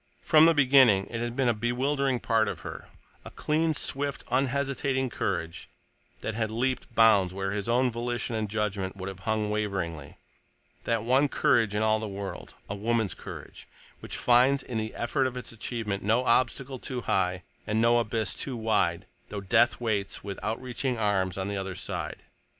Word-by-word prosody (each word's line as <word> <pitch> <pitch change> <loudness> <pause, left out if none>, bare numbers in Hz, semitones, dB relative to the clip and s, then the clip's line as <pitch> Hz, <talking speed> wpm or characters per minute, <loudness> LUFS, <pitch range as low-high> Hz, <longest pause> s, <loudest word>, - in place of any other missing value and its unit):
From 155 +1 +6
the 165 - +4
beginning 130 -8 +5
it 115 - -3
had 120 0 -3
been 135 -2 +1
a 120 - +4
bewildering 130 +4 0
part 110 -2 +2
of - - -4
her—a - - -11
clean, 155 +1 0
swift, 140 0 -1
unhesitating 135 0 0
courage 85 -4 -3 0.5
that 110 - -3
had 110 0 -1
leaped 120 +1 -2
bounds 100 -5 +5
where 95 0 -2
his 100 +2 -3
own 125 +1 +3
volition 120 0 -3
and 110 -2 -2
judgment 100 -3 -2
would 95 -1 -6
have 95 -1 -9
hung 110 -1 0
waveringly; 95 -8 -3 0.7
that 115 -2 0
one 130 +5 +3
courage 115 -6 +2
in 105 - +1
all 110 0 +3
the 110 - -4
world—a 100 0 -7
woman's 110 -2 0
courage—which - - -10
finds 130 +3 +4
in 120 -3 -3
the 110 0 -4
effort 130 +3 0
of 130 0 -6
its 125 - -5
achievement 110 -2 -3
no 115 +5 +2
obstacle 130 +2 +1
too 125 0 -4
high 90 -4 0 0.2
and 110 0 +1
no 120 +1 +4
abyss 110 -2 -1
too 130 -3 -4
wide 105 -6 +1 0.2
though 105 - -4
death 110 +5 +3
waits 105 -4 -2
with 100 -1 -6
outreaching 125 +3 -2
arms 95 -4 0
on 95 0 -2
the 100 0 -3
other 95 -1 -4
side. - - -5
115 Hz, 170 wpm, -28 LUFS, 100-125 Hz, 0.7 s, From